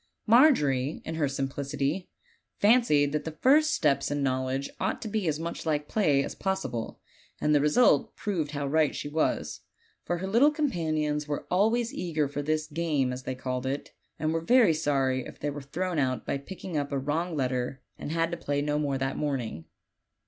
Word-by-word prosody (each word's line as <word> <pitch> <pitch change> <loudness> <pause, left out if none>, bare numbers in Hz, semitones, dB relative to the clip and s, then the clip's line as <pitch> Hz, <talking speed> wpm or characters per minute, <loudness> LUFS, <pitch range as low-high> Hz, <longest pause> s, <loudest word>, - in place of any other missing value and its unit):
Margery, 160 - +4
in 160 - -4
her 160 -3 0
simplicity, 140 +4 -2 0.5
fancied 205 - +4
that 150 0 -1
the 160 0 -7
first 305 +4 +5
steps 150 - +1
in 145 -1 -1
knowl 130 -1 0
edge 135 +1 -2
ought - - -1
to - - -4
be 210 -3 -1
as 155 -1 0
much 170 +1 -4
like 150 -2 -1
play 150 -10 +2
as - - -5
possible; 160 - -3 0.4
and 150 - +2
the 145 - +4
result 150 - +3
proved 175 -8 -2
how 145 -1 -3
right 150 +1 +2
she - - -4
was, 155 +2 -1 0.4
for 175 - -1
her 185 - -4
little 235 +9 +5
companions 155 - -1
were 145 -1 -3
always 225 +6 +2
eager 160 - -1
for 145 +1 -4
this 155 +1 0
"game," 150 -4 -1
as 125 0 -8
they 130 - -3
called 130 0 -3
it, 140 +2 -3 0.3
and 155 0 -1
were 165 - 0
very 230 -1 +5
sorry 135 -4 0
if - - -10
they 145 - -2
were 145 0 -6
thrown 175 +5 -2
out 130 -2 0
by 140 - -2
picking 180 +3 -8
up 145 -1 -1
a 140 - 0
wrong 155 +5 -1
letter, 130 0 -2 0.2
and - - -5
had 165 +1 0
to 170 - -3
play 145 -3 -2
no 150 +1 0
more 140 -2 0
that 135 0 -2
morning. 125 - -3
150 Hz, 195 wpm, -28 LUFS, 140-175 Hz, 0.5 s, first